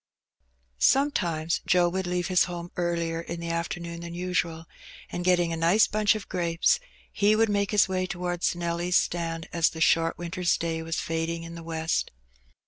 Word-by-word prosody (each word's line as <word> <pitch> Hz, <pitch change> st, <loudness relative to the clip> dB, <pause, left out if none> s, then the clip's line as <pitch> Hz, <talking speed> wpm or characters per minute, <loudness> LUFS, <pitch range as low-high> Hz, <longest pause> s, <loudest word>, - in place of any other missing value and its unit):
Sometimes 170 Hz, -, +2 dB
Joe 180 Hz, -1 st, +4 dB
would 190 Hz, +1 st, -2 dB
leave 180 Hz, 0 st, -1 dB
his 180 Hz, -1 st, +4 dB
home 175 Hz, -1 st, -6 dB
earlier 170 Hz, -1 st, -1 dB
in 170 Hz, 0 st, -6 dB
the 170 Hz, 0 st, -4 dB
after« 170 Hz, +1 st, -2 dB
noon 170 Hz, 0 st, -7 dB
than 170 Hz, 0 st, -7 dB
usual, 175 Hz, -2 st, -2 dB, 0.5 s
and 175 Hz, -, -3 dB
getting 175 Hz, -2 st, +2 dB
a -, -, -1 dB
nice 170 Hz, +6 st, +4 dB
bunch 215 Hz, +1 st, +2 dB
of 215 Hz, -, -6 dB
grapes, 170 Hz, -2 st, +1 dB, 0.3 s
he 205 Hz, +1 st, +3 dB
would 225 Hz, 0 st, +3 dB
make 200 Hz, -1 st, +1 dB
his 210 Hz, -2 st, +4 dB
way 185 Hz, -1 st, -1 dB
towards 175 Hz, -1 st, -1 dB
Nelly's 175 Hz, +1 st, 0 dB
stand 165 Hz, -1 st, -2 dB
as 170 Hz, -1 st, +3 dB
the 160 Hz, -, -9 dB
short 165 Hz, 0 st, +3 dB
winter's 175 Hz, 0 st, 0 dB
day 165 Hz, -1 st, -2 dB
was 165 Hz, 0 st, -3 dB
fading 165 Hz, +1 st, -2 dB
in 165 Hz, 0 st, -8 dB
the 170 Hz, -, -8 dB
west. 160 Hz, 0 st, -1 dB
170 Hz, 180 wpm, -27 LUFS, 165-180 Hz, 0.5 s, Joe